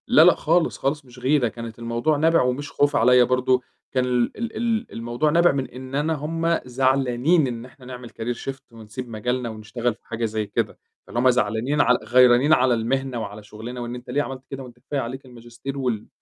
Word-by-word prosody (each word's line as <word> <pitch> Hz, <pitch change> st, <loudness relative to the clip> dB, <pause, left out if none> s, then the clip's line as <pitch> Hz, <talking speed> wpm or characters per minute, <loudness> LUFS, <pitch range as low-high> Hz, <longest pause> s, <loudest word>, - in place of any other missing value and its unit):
لا، 155 Hz, -, +6 dB
لأ، 175 Hz, +2 st, +7 dB
خالص 165 Hz, +2 st, +1 dB
خالص 140 Hz, +1 st, -2 dB
مش 125 Hz, 0 st, -14 dB
غيرة، 130 Hz, 0 st, +2 dB
كانت 115 Hz, 0 st, -8 dB
الموضوع 120 Hz, +6 st, 0 dB
نابع 165 Hz, +2 st, +4 dB
ومش 125 Hz, +3 st, -1 dB
خوف 145 Hz, 0 st, +2 dB
عليا 125 Hz, +2 st, +6 dB
برضو 125 Hz, 0 st, +2 dB, 0.3 s
كان 130 Hz, -1 st, +1 dB
ال 125 Hz, -1 st, 0 dB
ال 230 Hz, 0 st, -4 dB
ال 230 Hz, 0 st, -1 dB
الموضوع 120 Hz, +6 st, -1 dB
نابع 170 Hz, +3 st, +5 dB
من 135 Hz, -1 st, -2 dB
إن 130 Hz, +1 st, -8 dB
أنا 150 Hz, +3 st, +1 dB
هُم 165 Hz, +3 st, 0 dB
زعلانين 130 Hz, +4 st, +2 dB
إن 120 Hz, -1 st, -5 dB
إحنا 130 Hz, 0 st, -16 dB
نعمل 125 Hz, -1 st, -8 dB
Career 115 Hz, +2 st, -4 dB
Shift 135 Hz, 0 st, -6 dB
ونسيب 115 Hz, +2 st, -8 dB
مجالنا 125 Hz, +2 st, -2 dB
ونشتغل 110 Hz, +2 st, -3 dB
في -, -, -27 dB
حاجة 115 Hz, 0 st, -2 dB
زي 110 Hz, -1 st, -2 dB
كده، -, -, -2 dB, 0.3 s
طالما 125 Hz, +2 st, +2 dB
زعلانين 120 Hz, +4 st, +1 dB
عل 125 Hz, -, +4 dB
غيرانين 125 Hz, +5 st, +5 dB
على 130 Hz, -3 st, +4 dB
المهنة 125 Hz, +2 st, -1 dB
وعلى 105 Hz, 0 st, -7 dB
شغلنا 110 Hz, +4 st, -8 dB
وإن 120 Hz, 0 st, -4 dB
أنت 125 Hz, 0 st, -10 dB
ليه 145 Hz, -, +1 dB
عملت 135 Hz, -2 st, -6 dB
كده؟ 135 Hz, -1 st, -6 dB
وأنت 120 Hz, -1 st, -13 dB
كفاية 135 Hz, +3 st, -3 dB
عليك 130 Hz, +2 st, -5 dB
الماجستير 120 Hz, +2 st, -8 dB
وال 120 Hz, -6 st, -2 dB
125 Hz, 200 wpm, -23 LUFS, 120-140 Hz, 0.3 s, لأ